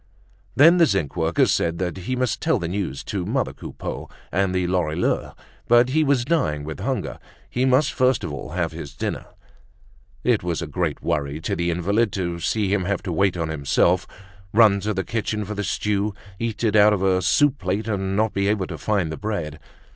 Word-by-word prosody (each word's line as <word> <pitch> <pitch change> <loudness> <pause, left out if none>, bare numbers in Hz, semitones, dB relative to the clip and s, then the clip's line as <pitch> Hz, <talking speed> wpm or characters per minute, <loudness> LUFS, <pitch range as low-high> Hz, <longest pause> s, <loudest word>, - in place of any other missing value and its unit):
Then 165 +6 +7
the 170 -2 +6
zinc 95 - -1
worker 80 0 +2
said 85 0 +1
that 90 -1 -2
he 95 +7 -3
must 125 -1 -1
tell 160 -5 +2
the 85 -5 -3
news 90 -6 -3
to 95 -3 -3
mother 120 +6 -1
Coupeau - - -7 0.2
and 95 +1 +1
the 90 -1 +1
Lorilleuxs, 90 -2 0 0.3
but 120 +1 +5
he 155 +4 +2
was 140 -4 +2
dying 80 - 0
with 75 +1 -6
hunger, 130 +6 -3 0.3
he 125 +1 +1
must 130 +3 +3
first 130 0 +2
of 80 -4 -4
all 75 - -6
have 85 0 -1
his 75 -3 -8
dinner. - - -4 1.0
It - - +2
was 85 -2 -2
a 85 - -3
great 75 0 -2
worry 70 0 -1
to - - -2
the 85 +1 -1
invalid 100 +6 +1
to 85 -3 -2
see 100 +2 0
him 95 -3 +1
have 100 0 -1
to 90 -3 -3
wait 95 +1 +2
on 80 -2 -2
himself, 80 +4 +1 0.5
run 105 -3 +6
to 105 +1 -2
the 95 - -1
kitchen 105 -1 -2
for 105 - -5
the 105 0 -3
stew, 105 0 -1 0.2
eat 115 0 -3
it 110 -2 +2
out 105 0 +6
of 95 -2 -1
a 95 -1 +3
soup 140 - +3
plate, 95 +4 -2
and 95 -3 -1
not 110 +1 +1
be 100 0 0
able 100 -2 +1
to - - -7
find 100 -7 0
the 80 - -5
bread. 85 -8 -4
95 Hz, 205 wpm, -23 LUFS, 85-110 Hz, 1.0 s, Then